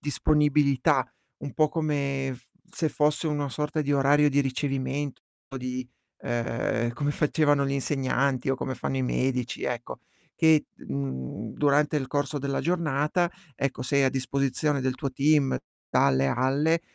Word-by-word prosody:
disponibilità, 145 -1 +2 0.4
un 140 -3 -5
po' 155 -1 +3
come 140 -4 -1
f 125 0 -17 0.2
se 160 - -1
fosse 150 +2 +1
una 145 -2 -1
sorta 150 +3 -2
di 145 0 0
orario 145 +1 +4
di 145 +1 +3
ricevimento, 135 +1 -2 0.4
di, 125 0 -4 0.4
uhm, 120 0 -1
come 145 +2 -1
facevano 145 -1 +2
gli 135 - -1
insegnanti, 135 -1 0
o 135 - +3
come 130 0 -4
fanno 130 +2 -3
i 130 - 0
medici, 125 -1 -1
ecco. 120 -1 -4 0.4
Che, 160 -2 +4
mhmm, 70 - -5
durante 150 +1 +2
il 135 - -4
corso 145 +1 -1
della 140 0 -2
giornata, 170 +1 +1 0.2
ecco, 135 -1 -2
sei 140 +2 +2
a 130 - +4
disposizione 135 +2 0
del 130 -1 0
tuo 135 -1 -4
team 145 0 +3 0.4
dalle 70 0 +3
alle 140 - +2
140 Hz, 145 wpm, -27 LUFS, 130-150 Hz, 0.4 s, orario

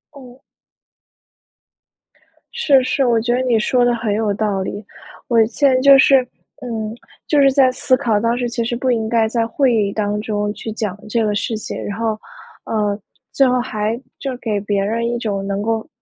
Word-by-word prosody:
嗯。 255 -2 -13 2.1
是， 290 - +3
是， 270 +1 0
我 235 -2 +3
觉 240 +1 0
得 250 - +1
你 250 -3 +2
说 245 +3 +2
的 240 0 +2
很 225 -3 -2
有 210 -1 0
道 200 -2 -1
理。 200 +2 -5 0.4
我 230 -2 +4
现 240 +6 +1
在 255 - +3
就 275 0 +8
是 270 0 +5 0.4
嗯， 220 -3 -4 0.3
就 295 - +2
是 275 -1 +5
在 265 -1 +4
思 255 +1 +1
考， 225 -4 +1
当 230 +2 0
时 245 -1 -1
其 235 0 -2
实 240 +1 -2
不 255 +1 0
应 225 -2 0
该 225 -1 +2
在 230 0 0
会 260 +1 +1
议 210 -3 +1
当 210 0 -2
中 210 -1 -2
去 220 - -7
讲 210 -3 -4
这 230 +1 +1
个 210 - 0
事 215 +3 -2
情， 215 - -6
然 205 - -5
后， 225 -1 -2 0.5
呃， 210 -2 -1 0.3
最 270 - +3
后 250 0 +2
还 220 -2 -2 0.2
就 270 -2 -4
给 220 -4 -2
别 200 -1 -1
人 230 +3 -1
一 240 - -1
种 205 -4 -3
能 200 0 -2
够， 225 +1 -2
230 Hz, 210 characters per minute, -19 LUFS, 210-250 Hz, 2.1 s, 就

